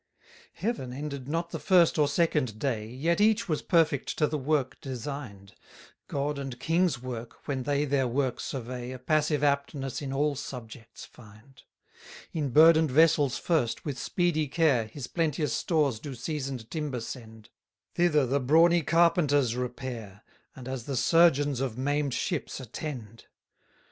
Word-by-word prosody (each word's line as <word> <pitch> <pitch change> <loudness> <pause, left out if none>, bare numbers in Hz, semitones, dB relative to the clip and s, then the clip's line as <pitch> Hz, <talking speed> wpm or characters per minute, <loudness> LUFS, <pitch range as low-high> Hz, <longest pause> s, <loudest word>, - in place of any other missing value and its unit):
141 210 - -2
Heaven 145 +3 -5
ended 140 -3 -6
not 165 +3 -2
the - - -4
first 175 -4 +4
or 150 - +4
second 145 - 0
day, 110 -4 -2
Yet 155 - 0
each 215 -1 +3
was 155 -4 -1
perfect 160 -6 +1
to 155 - +3
the 150 - -2
work 140 -2 -1
design'd; 125 -7 -7 0.5
God 140 +1 -2
and 135 -3 -6
king's 165 -4 +1
work, 120 -2 -8
when 135 -2 -1
they 145 +2 0
their 135 -2 +1
work 130 +1 -1
survey, 125 -1 -5
A - - -6
passive 150 +2 +1
aptness 140 -1 -1
in 135 -2 -4
all 145 +2 +1
subjects 115 -4 -9
find. 110 +4 -17 0.7
142 165 - -4
In 145 -2 -1
burden'd 160 +3 +6
vessels 150 -1 +4
first, 150 -10 0
with 140 -4 -4
speedy 170 -3 0
care, 140 -6 +2
His 125 +4 -7
plenteous 155 -2 -1
stores 145 -9 +1
do 140 +2 -7
seasoned 130 -3 -5
timber 150 -6 -3
send; 110 -2 -9 0.4
Thither 155 -5 +3
the 135 +3 +1
brawny 165 +6 +4
carpenters 150 -6 +3
repair, 120 -5 -6 0.3
And 130 -2 -10
as 130 -3 -5
the 135 -2 -3
surgeons 145 -4 +4
of 130 -4 -3
maim'd 145 0 0
ships 170 -6 -3
attend. 120 -3 -7
140 Hz, 155 wpm, -28 LUFS, 125-155 Hz, 0.7 s, burden'd